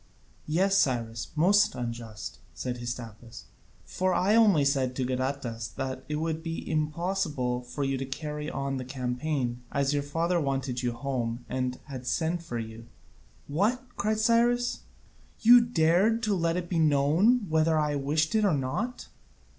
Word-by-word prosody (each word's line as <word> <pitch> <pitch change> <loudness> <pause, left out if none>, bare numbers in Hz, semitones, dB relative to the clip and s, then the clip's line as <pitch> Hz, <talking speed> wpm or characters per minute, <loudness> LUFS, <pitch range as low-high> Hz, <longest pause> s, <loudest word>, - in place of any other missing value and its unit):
"Yes, 190 +5 +2
Cyrus, 115 - 0
most 205 +6 +4
unjust," 115 - -6 0.2
said 125 -1 -4
Hystaspas, 120 -2 -7 0.4
"for 185 0 0
I 195 +3 +3
only 205 -10 +5
said 135 -2 +1
to 130 - -1
Gadatas 130 -2 -3
that 130 -1 -4
it 150 - -1
would 160 +1 -2
be 165 0 -5
impossible 155 -5 -1
for 125 +3 -5
you 135 -1 -1
to 135 - -3
carry 150 +2 -4
on 135 0 -3
the 130 - -4
campaign, 125 0 -2
as 140 0 +1
your 145 - +1
father 165 +4 0
wanted 135 -3 -2
you 120 -2 -1
home, 120 -2 -3
and 125 0 -2
had 130 -3 -8
sent 165 +3 0
for 120 -8 -5
you." 115 0 -7 0.6
"What?" 205 - +1
cried 215 +1 0
Cyrus, 240 +2 +2 0.6
"you 240 +2 +9
dared 215 +1 +2
to 215 -2 +1
let 165 -2 +1
that 175 0 -3
be 170 -1 0
known 160 - +3
whether 160 0 +2
I 150 -1 +1
wished 150 +3 0
it 220 -1 +3
or 195 -7 +3
not?" 175 - -3
145 Hz, 155 wpm, -28 LUFS, 125-175 Hz, 0.6 s, you